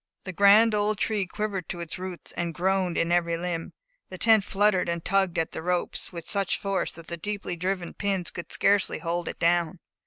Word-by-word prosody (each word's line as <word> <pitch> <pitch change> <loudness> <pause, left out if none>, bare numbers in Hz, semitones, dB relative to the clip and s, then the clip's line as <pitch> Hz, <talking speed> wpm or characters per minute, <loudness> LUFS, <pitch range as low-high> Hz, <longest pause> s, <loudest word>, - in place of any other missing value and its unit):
The 185 - -6
grand 205 +4 +6
old 210 0 +1
tree 205 -2 0
quivered 195 -3 -4
to 175 - -4
its 170 +1 -5
roots, 185 -1 -7
and 170 -2 -3
groaned 185 0 0
in 165 - +1
every 170 -1 +2
limb. 170 -1 -4 0.4
The 185 - -8
tent 220 0 +5
fluttered 200 -2 +2
and 170 -1 -3
tugged 195 -2 +1
at 165 - 0
the - - -5
ropes 180 +1 0
with 170 -2 -8
such 200 -2 0
force 195 -1 -1
that 165 - -11
the 170 +1 -6
deeply 200 0 -4
driven 180 0 -3
pins 195 -4 -2
could 170 - -8
scarcely 200 -1 +2
hold 170 +1 -3
it - - -5
down. 170 +1 +1
180 Hz, 205 wpm, -26 LUFS, 170-200 Hz, 0.4 s, grand